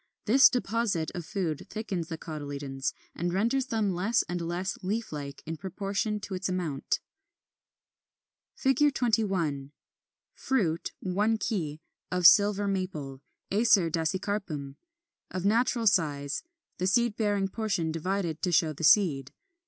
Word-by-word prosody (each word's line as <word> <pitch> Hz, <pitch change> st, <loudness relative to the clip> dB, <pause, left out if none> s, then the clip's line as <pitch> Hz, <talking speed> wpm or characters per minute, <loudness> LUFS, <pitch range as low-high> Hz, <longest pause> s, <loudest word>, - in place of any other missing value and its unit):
This 265 Hz, +5 st, +7 dB
deposit 225 Hz, -8 st, -1 dB
of 175 Hz, -2 st, -6 dB
food 180 Hz, -8 st, -3 dB
thickens 195 Hz, -6 st, -4 dB
the 165 Hz, -1 st, -5 dB
cotyledons, 140 Hz, -4 st, -4 dB, 0.2 s
and 175 Hz, +1 st, -2 dB
renders 235 Hz, +8 st, +1 dB
them 215 Hz, -5 st, 0 dB
less 200 Hz, +7 st, +1 dB
and 175 Hz, 0 st, -3 dB
less 175 Hz, +3 st, -3 dB
leaf 215 Hz, +5 st, -2 dB
like 140 Hz, -2 st, -6 dB
in 160 Hz, +1 st, -5 dB
proportion 200 Hz, +4 st, -2 dB
to 195 Hz, -, -6 dB
its 185 Hz, +1 st, -2 dB
amount. 170 Hz, -7 st, -2 dB, 1.6 s
[Illustration: 270 Hz, +3 st, +5 dB
Fig. 285 Hz, -, 0 dB
21. 185 Hz, -, 0 dB, 0.6 s
Fruit 180 Hz, -12 st, -1 dB
(one 205 Hz, +4 st, +1 dB
key) 160 Hz, -9 st, -3 dB, 0.3 s
of 180 Hz, -1 st, 0 dB
Silver 205 Hz, +2 st, +6 dB
Maple, 160 Hz, -9 st, -3 dB, 0.3 s
Acer 200 Hz, -5 st, +4 dB
dasycarpum, 165 Hz, -3 st, -2 dB, 0.6 s
of 185 Hz, 0 st, -4 dB
natural 230 Hz, +2 st, +2 dB
size, 145 Hz, -8 st, +1 dB, 0.4 s
the 185 Hz, -, +1 dB
seed 235 Hz, +2 st, +2 dB
bearing 205 Hz, -3 st, +1 dB
portion 195 Hz, -6 st, -1 dB
divided 170 Hz, 0 st, -2 dB
to 180 Hz, -, 0 dB
show 160 Hz, -2 st, +3 dB
the 155 Hz, -, -8 dB
seed. 145 Hz, -6 st, +4 dB
185 Hz, 130 wpm, -28 LUFS, 160-210 Hz, 1.6 s, This